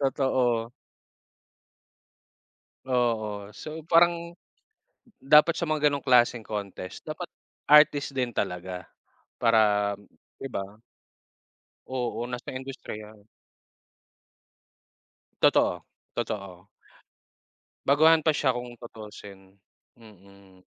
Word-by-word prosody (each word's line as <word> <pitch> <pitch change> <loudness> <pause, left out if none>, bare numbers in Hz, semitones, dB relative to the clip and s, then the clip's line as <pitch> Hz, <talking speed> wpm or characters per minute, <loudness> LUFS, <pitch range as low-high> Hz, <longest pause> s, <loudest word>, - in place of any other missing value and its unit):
Totoo. 125 -4 +1 2.1
Oo. 110 -5 -1
So, 155 +1 -8
parang 170 0 +3 0.8
dapat 150 +4 +5
sa 170 - -1
mga 150 -1 +3
ganong 140 -2 -3
klaseng 120 -3 +4
contest, 100 -3 -6
dapat 160 +3 -6 0.4
artist 150 -1 +5
din 125 -3 -2
talaga 90 -2 -3 0.5
para 105 -3 +3 0.5
di 135 - -5
ba? 100 -6 -4 1.2
Oo, 120 -2 -3
nasa 125 -1 -6
industriya. 110 -5 -9 2.1
Totoo, - - +3 0.3
totoo. 100 -6 -5 1.2
Baguhan 155 +3 +5
pa 160 - +4
siya 135 -4 +1
kung 120 0 -6
tutusin. 105 -4 -12 0.5
Mm. 100 -3 -18
120 Hz, 80 wpm, -27 LUFS, 105-140 Hz, 2.1 s, dapat